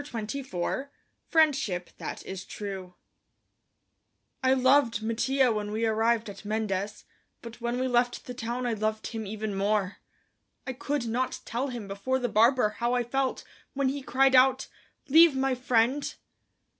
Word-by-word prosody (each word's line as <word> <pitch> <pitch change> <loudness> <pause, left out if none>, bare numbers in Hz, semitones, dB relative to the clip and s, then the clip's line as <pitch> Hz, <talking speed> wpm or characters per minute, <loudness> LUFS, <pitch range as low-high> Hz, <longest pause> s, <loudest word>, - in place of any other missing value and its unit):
CHAPTER 270 -5 -7
XXIV 240 +2 -3 0.4
FRIENDSHIP 275 - +1
THAT - - -6
IS 190 -1 -6
TRUE 190 -3 -7 1.5
I 260 0 +4
loved 255 -4 +3
Mattia 250 +3 +2
when 210 -1 -2
we 220 +2 0
arrived 225 +1 +1
at 200 0 -9
Mendes, 210 -2 -3 0.4
but 235 0 -10
when 240 +1 -1
we 260 - 0
left 245 -1 +1
the 250 - -6
town 245 +1 -3
I 240 - 0
loved 215 0 -2
him 220 -3 -5
even 215 0 -4
more. 200 0 0 0.7
I 265 - -3
could 285 0 -2
not 245 +3 -2
tell 245 +4 -2
him 240 -6 -6
before 200 +7 -1
the 245 -2 -2
barber 230 0 +4
how 240 +1 +1
I 245 - +1
felt 265 +2 -1 0.3
when 275 -1 +1
he 280 +1 -3
cried 270 0 +3
out: 260 +1 +5 0.4
"Leave 320 +1 +7
my 265 0 +1
friend!" 255 +2 +1
240 Hz, 155 wpm, -28 LUFS, 215-260 Hz, 1.5 s, Leave